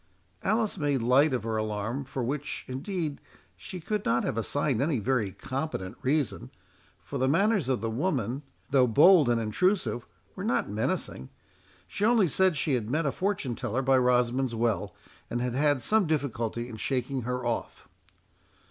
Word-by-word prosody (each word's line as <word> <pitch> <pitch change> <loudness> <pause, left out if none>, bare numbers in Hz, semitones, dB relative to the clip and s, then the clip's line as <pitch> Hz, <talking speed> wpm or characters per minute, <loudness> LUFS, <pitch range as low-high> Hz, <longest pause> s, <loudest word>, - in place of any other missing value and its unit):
Alice 215 -1 0
made 145 -5 0
light 135 +5 +4
of 125 -4 -1
her 110 -1 -2
alarm, 110 +5 -2
for 135 -1 -4
which, 145 +4 -3
indeed, 150 +3 -3 0.3
she 185 - -8
could 210 +5 -2
not 120 +2 +1
have - - -1
assigned 130 +2 0
any 145 -1 +1
very 115 -3 0
competent 130 -6 -4
reason, 140 -1 -1 0.5
for - - -5
the 130 - +2
manners 190 - +2
of 130 -6 0
the 115 - -1
woman, 130 - -1 0.3
though 130 -2 +5
bold 150 - +6
and 120 -1 +2
intrusive, 120 - 0 0.3
were - - -6
not - - +1
menacing. 65 - -2 0.6
She 195 - -4
only 220 -3 +4
said 185 +1 +2
she 145 +1 0
had 115 -4 -1
met 155 +5 0
a 140 - +1
fortune 185 -9 -1
teller 120 +2 -2
by 135 0 +4
Rosamond's 125 0 +2
Well, 115 -2 -1 0.3
and 120 - -2
had 125 0 -1
had 145 -1 +2
some 215 -4 +3
difficulty 120 -6 -2
in 115 -3 -8
shaking 130 +2 -1
her 125 +1 -3
off. 120 -1 -3
130 Hz, 165 wpm, -28 LUFS, 120-155 Hz, 0.6 s, bold